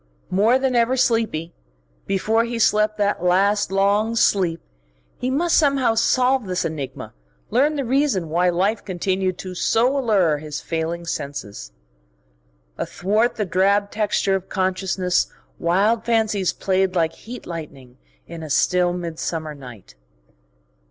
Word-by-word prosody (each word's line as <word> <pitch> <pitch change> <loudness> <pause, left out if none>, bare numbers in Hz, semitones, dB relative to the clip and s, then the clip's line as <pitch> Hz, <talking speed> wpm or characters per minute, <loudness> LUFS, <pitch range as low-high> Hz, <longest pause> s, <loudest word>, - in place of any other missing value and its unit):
More 215 +7 +4
than 265 -1 0
ever 240 +2 +2
sleepy, 225 -10 0 0.5
before 220 +4 +1
he 235 0 -4
slept 215 -1 +2
that 205 -3 0
last, 195 +3 +2
long 200 +3 +2
sleep 185 -6 +2 0.6
he 250 - -1
must 330 +6 +1
somehow 275 -6 +3
solve 250 +1 +2
this 180 0 -1
enigma, 150 -4 -5 0.4
learn 280 +7 +2
the 280 -2 -2
reason 255 - +1
why 175 +3 +2
life 195 +5 0
continued 185 0 -2 0.2
so 230 +6 +2
to 280 - 0
allure 190 - +2
his 150 -1 -6
failing 165 +1 -3
senses. 140 - -6 1.1
Athwart 215 +6 0
the 210 - -1
drab 200 +3 +2
texture 205 -2 0
of 190 -1 -2
consciousness 185 -1 0 0.3
wild 200 +7 +2
fancies 220 -5 +1
played 190 -1 0
like 165 -2 +1
heat 245 +3 -10
lightning 140 -7 -9 0.3
in 165 -1 -9
a 155 - -7
still 180 +4 +2
midsummer 165 -2 -4
night. 125 -8 -12
195 Hz, 130 wpm, -22 LUFS, 170-225 Hz, 1.1 s, More